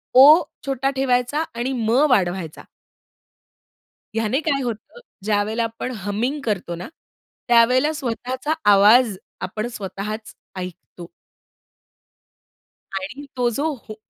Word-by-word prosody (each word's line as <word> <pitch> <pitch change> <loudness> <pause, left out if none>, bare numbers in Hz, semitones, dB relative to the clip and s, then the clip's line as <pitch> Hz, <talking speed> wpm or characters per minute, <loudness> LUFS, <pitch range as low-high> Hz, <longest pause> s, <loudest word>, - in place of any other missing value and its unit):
ओ 295 +6 +9 0.2
छोटा 270 -1 0
ठेवायचा 265 +3 +1
आणि 240 +3 -2
म 220 - +1 0.2
वाढवायचा. 180 - 0 1.5
ह्याने 225 +4 +1
काय 285 -3 0
होतं, 235 - -6 0.2
ज्यावेळेला 215 +2 0
आपण 230 +3 -4
हमिंग 235 +8 -1
करतो 185 -6 -2
ना, 175 - -7 0.6
त्यावेळेला 250 +4 +4
स्वतःचा 260 +2 -3 0.2
आवाज 210 +3 +6 0.3
आपण 215 +5 -3
स्वतःच 210 +1 -6 0.2
ऐकतो. 180 -1 -8 1.9
आणि 215 +10 -5
तो 245 -1 +2
जो 310 +3 0 0.2
हुं 215 - -7
230 Hz, 100 wpm, -22 LUFS, 205-260 Hz, 1.9 s, ओ